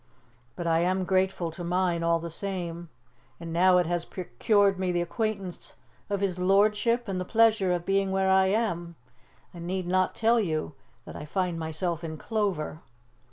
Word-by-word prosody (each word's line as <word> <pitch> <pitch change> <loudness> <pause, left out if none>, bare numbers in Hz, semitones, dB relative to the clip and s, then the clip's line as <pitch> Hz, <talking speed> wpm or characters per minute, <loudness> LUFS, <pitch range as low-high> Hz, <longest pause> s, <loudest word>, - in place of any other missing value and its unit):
But 175 - -5
I 165 -1 +3
am 185 +2 +1
grateful 185 -2 0
to 175 +2 -8
mine, 175 -1 0
all 170 0 +2
the 165 0 -6
same, 175 -2 -4 0.5
and 165 -1 -6
now 180 +2 +5
it 180 - +3
has 175 +1 -1
procured 195 - +1
me 185 -1 0
the 175 0 0
acquaintance 195 -1 -4 0.3
of 200 -1 -1
his 185 -2 -1
lordship 210 +5 +2
and 185 -2 -2
the - - -1
pleasure 220 -2 +3
of 175 -1 -1
being 195 0 +1
where 190 0 +2
I 190 0 +5
am. 175 -5 -1 0.6
I 175 - -10
need 180 +2 -3
not 185 +1 +1
tell 230 +1 +3
you 155 -7 -2 0.3
that - - -9
I - - -7
find 180 +1 -2
myself 165 +1 -2
in 160 -1 -5
clover." 195 -7 -2
185 Hz, 175 wpm, -27 LUFS, 170-195 Hz, 0.6 s, now